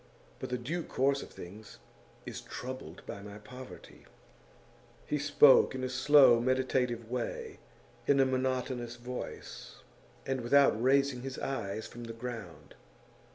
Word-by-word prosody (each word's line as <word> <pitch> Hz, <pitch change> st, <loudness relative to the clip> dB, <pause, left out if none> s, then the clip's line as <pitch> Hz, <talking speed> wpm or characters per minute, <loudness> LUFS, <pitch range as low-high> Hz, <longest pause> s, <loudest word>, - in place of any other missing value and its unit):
But -, -, -5 dB
the 125 Hz, -, -1 dB
due 155 Hz, +9 st, -3 dB
course 140 Hz, -2 st, +1 dB
of -, -, -9 dB
things 100 Hz, +4 st, -11 dB, 0.5 s
is -, -, -6 dB
troubled 125 Hz, -10 st, -8 dB
by 100 Hz, -, -7 dB
my 105 Hz, 0 st, -9 dB
poverty.' 125 Hz, +4 st, -12 dB, 1.0 s
He 150 Hz, -, -1 dB
spoke 145 Hz, -1 st, +6 dB
in 130 Hz, -, -4 dB
a 130 Hz, -, -1 dB
slow, 130 Hz, -2 st, +6 dB
meditative 125 Hz, -2 st, 0 dB
way, 125 Hz, -2 st, -4 dB, 0.5 s
in 140 Hz, -1 st, +4 dB
a 135 Hz, -, +6 dB
monotonous 130 Hz, -2 st, -1 dB
voice, 125 Hz, +1 st, -7 dB, 0.5 s
and 135 Hz, -1 st, -1 dB
without 140 Hz, +4 st, +5 dB
raising 135 Hz, 0 st, +3 dB
his 130 Hz, 0 st, -6 dB
eyes 110 Hz, -5 st, -3 dB
from 120 Hz, 0 st, -9 dB
the 115 Hz, -, -6 dB
ground. 110 Hz, -, -8 dB
125 Hz, 135 wpm, -31 LUFS, 115-135 Hz, 1.0 s, spoke